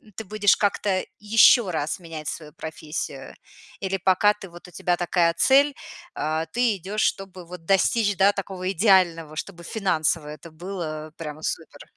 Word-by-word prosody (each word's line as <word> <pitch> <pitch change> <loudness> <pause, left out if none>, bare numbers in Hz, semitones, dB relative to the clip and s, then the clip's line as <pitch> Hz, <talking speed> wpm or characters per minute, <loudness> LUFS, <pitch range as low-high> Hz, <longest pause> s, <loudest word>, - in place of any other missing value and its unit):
ты 220 - -5
будешь 205 0 +3
как-то 200 -2 0 0.2
ещё 215 0 +5
раз 155 +1 -2
менять 160 -3 -8
свою 150 -2 -8
профессию? 160 0 -6 0.5
Или 195 -1 -1
пока 190 +3 +3
ты 195 -3 -11
вот 175 +1 -13
у - - -14
тебя 175 +1 0
такая 175 -1 +2
цель, 280 +1 +4 0.4
э, 155 +1 -1
ты 240 -3 +2
идёшь, 200 +4 -4
чтобы 190 -2 -2
вот 175 -1 -11
достичь, 205 +3 +2
да, 195 +1 +5
такого 190 -2 -4
идеального, 175 -5 +3
чтобы 170 +1 -7
финансово 165 -6 0
это 150 +2 -10
было 155 -3 -6
прямо 155 -1 -7
супер? - - -5
180 Hz, 155 wpm, -24 LUFS, 160-200 Hz, 0.5 s, ещё